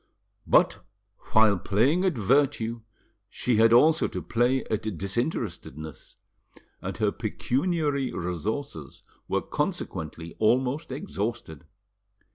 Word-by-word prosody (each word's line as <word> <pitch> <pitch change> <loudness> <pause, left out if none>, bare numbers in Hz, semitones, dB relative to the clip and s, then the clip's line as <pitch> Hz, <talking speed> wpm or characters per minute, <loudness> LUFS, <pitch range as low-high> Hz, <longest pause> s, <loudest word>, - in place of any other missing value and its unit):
But 100 - +3 0.5
while 110 -4 +5
playing 135 - +2
at 180 -8 +1
virtue 115 0 +1 0.5
she 120 +2 0
had 115 +1 +6
also 155 +7 +5
to - - -5
play 120 +3 +1
at 110 -3 -3
disinterestedness, 95 - -4 0.7
and - - -5
her - - +1
pecuniary 145 -1 -1
resources 90 - -4 0.2
were - - 0
consequently 80 +1 -4
almost 125 +7 +1
exhausted. 105 - -4
115 Hz, 95 wpm, -27 LUFS, 100-140 Hz, 0.7 s, had